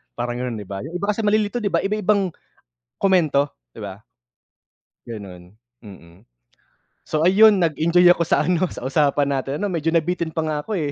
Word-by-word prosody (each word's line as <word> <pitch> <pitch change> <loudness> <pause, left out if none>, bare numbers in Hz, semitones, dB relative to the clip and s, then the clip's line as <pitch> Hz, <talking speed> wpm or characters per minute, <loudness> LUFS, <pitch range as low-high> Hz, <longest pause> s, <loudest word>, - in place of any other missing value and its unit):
parang 120 0 -3
'yon, 125 -2 -3
'di 105 - -6
ba? 95 0 -7
'Yung 160 - -8
iba 200 +3 -3
kasi 210 - -6
malilito, 215 +2 +1
'di 210 - -2
ba, - - 0
iba-ibang 200 -2 0 0.7
komento, 155 -7 +2 0.2
'di - - -14
ba? 100 +1 -8 1.1
Gano'n, 95 -4 -10 0.3
mm. 95 - -15 0.7
So, 155 +1 -1
ayun, 205 +3 +6
nag-enjoy 170 +1 +2
ako 170 - -1
sa 155 - +1
ano, 180 0 +1
sa - - -8
usapan 145 0 +1
natin, 135 +2 -3
'no, 200 -1 -3
medyo 165 -1 -1
nabitin 170 0 0
pa 160 0 -3
nga 155 -1 -2
ako, 210 +5 -4
eh. 150 -4 -2
160 Hz, 175 wpm, -21 LUFS, 125-185 Hz, 1.1 s, ayun